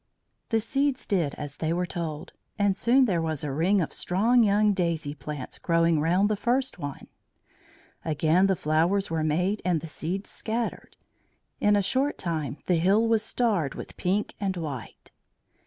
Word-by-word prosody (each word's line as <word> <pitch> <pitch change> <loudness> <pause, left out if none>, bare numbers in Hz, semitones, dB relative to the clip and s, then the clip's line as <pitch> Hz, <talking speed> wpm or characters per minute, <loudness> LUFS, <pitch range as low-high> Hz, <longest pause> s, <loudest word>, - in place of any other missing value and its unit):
The 225 - +2
seeds 270 +4 0
did 170 -8 0
as 145 -1 -7
they 160 0 -1
were 180 +2 0
told, 165 -3 -5 0.3
and 205 -2 +2
soon 255 +5 +4
there 180 -7 +1
was 160 -3 -2
a 145 - -2
ring 180 +8 +2
of 160 - -3
strong 225 +7 +2
young 210 -1 +4
daisy 170 -6 -1
plants 145 -2 -7
growing 165 -1 +2
round 180 +6 +3
the 215 - +1
first 245 +1 -1
one. 145 -3 -6 1.0
Again 160 +4 +2
the 190 - +2
flowers 165 +5 +1
were 160 -1 0
made 180 +7 0
and 175 -2 +1
the 165 - -8
seeds 175 +5 -4
scattered; 230 +1 -4 0.6
in 210 0 +4
a 200 - +2
short 265 +8 0
time 155 -5 -3
the 180 - +2
hill 200 +7 +3
was 225 -1 +3
starred 215 - 0
with - - -8
pink 195 +4 -1
and 195 -2 -1
white. 145 -8 -7
180 Hz, 170 wpm, -27 LUFS, 160-210 Hz, 1.0 s, soon